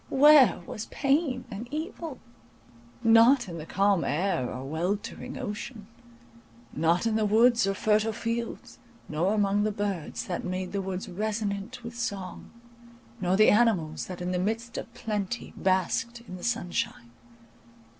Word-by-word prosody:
Where 275 Hz, -, +6 dB
was 215 Hz, -, -6 dB
pain 275 Hz, -3 st, 0 dB
and 220 Hz, +4 st, -6 dB
evil? 310 Hz, -1 st, -5 dB, 0.9 s
Not 230 Hz, +3 st, +6 dB
in 170 Hz, -2 st, -6 dB
the 155 Hz, -, -8 dB
calm 195 Hz, -3 st, +2 dB
air 160 Hz, -2 st, 0 dB
or 130 Hz, +1 st, -6 dB
weltering 180 Hz, +9 st, -3 dB
ocean; 215 Hz, -1 st, -6 dB, 0.9 s
not 165 Hz, +6 st, +2 dB
in 225 Hz, -1 st, +1 dB
the 215 Hz, -, +1 dB
woods 230 Hz, 0 st, +4 dB
or 195 Hz, -, 0 dB
fertile 215 Hz, +2 st, +2 dB
fields, 230 Hz, +2 st, -4 dB, 0.3 s
nor 175 Hz, +7 st, 0 dB
among 205 Hz, -1 st, +2 dB
the 215 Hz, +1 st, +1 dB
birds 200 Hz, -6 st, -3 dB
that 175 Hz, -, -3 dB
made 185 Hz, 0 st, -3 dB
the 200 Hz, -, -1 dB
woods 190 Hz, 0 st, -4 dB
resonant 210 Hz, +4 st, -3 dB
with 235 Hz, 0 st, -7 dB
song, 200 Hz, -6 st, -5 dB, 0.7 s
nor 185 Hz, 0 st, +1 dB
the 215 Hz, -, +7 dB
animals 205 Hz, -9 st, +2 dB
that 180 Hz, -1 st, -7 dB
in 180 Hz, -, -2 dB
the 180 Hz, -, 0 dB
midst 225 Hz, +4 st, -2 dB
of -, -, -8 dB
plenty 215 Hz, -1 st, -3 dB
basked 190 Hz, +5 st, 0 dB
in 185 Hz, -6 st, -9 dB
the 180 Hz, -, -10 dB
sunshine. 175 Hz, -, -2 dB
205 Hz, 145 wpm, -28 LUFS, 185-235 Hz, 0.9 s, the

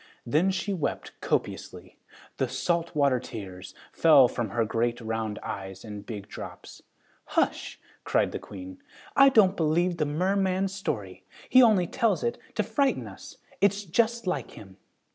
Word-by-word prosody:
Then 155 Hz, +10 st, +2 dB
she 190 Hz, +2 st, -1 dB
wept 170 Hz, -6 st, -3 dB
copiously. -, -, -3 dB, 0.4 s
The 130 Hz, -, 0 dB
salt 170 Hz, +6 st, -1 dB
water 140 Hz, -4 st, +3 dB
tears 95 Hz, -6 st, -9 dB, 0.2 s
fell 150 Hz, -6 st, +7 dB
from 120 Hz, -2 st, -3 dB
her 115 Hz, +3 st, 0 dB
great 120 Hz, +2 st, -1 dB
round 110 Hz, -2 st, -3 dB
eyes 95 Hz, 0 st, -6 dB
in 105 Hz, -2 st, -7 dB
big 105 Hz, -2 st, -7 dB
drops. -, -, -10 dB, 0.6 s
"Hush!" -, -, 0 dB, 0.2 s
cried -, -, +1 dB
the -, -, -4 dB
Queen. 95 Hz, -2 st, -10 dB, 0.3 s
"I 275 Hz, 0 st, +8 dB
don't 205 Hz, -7 st, +5 dB
believe 170 Hz, +2 st, +1 dB
the 150 Hz, -2 st, 0 dB
merman's 190 Hz, +4 st, 0 dB
story. 105 Hz, -, -4 dB, 0.3 s
He 255 Hz, -, +7 dB
only 215 Hz, -7 st, +5 dB
tells 220 Hz, 0 st, 0 dB
it 235 Hz, 0 st, -1 dB, 0.2 s
to 215 Hz, -, +1 dB
frighten 245 Hz, +6 st, 0 dB
us. -, -, -11 dB, 0.2 s
It's 200 Hz, +1 st, +3 dB
just 230 Hz, +5 st, +1 dB
like 145 Hz, -9 st, -2 dB
him." 95 Hz, -2 st, -13 dB
155 Hz, 150 wpm, -27 LUFS, -, 0.6 s, I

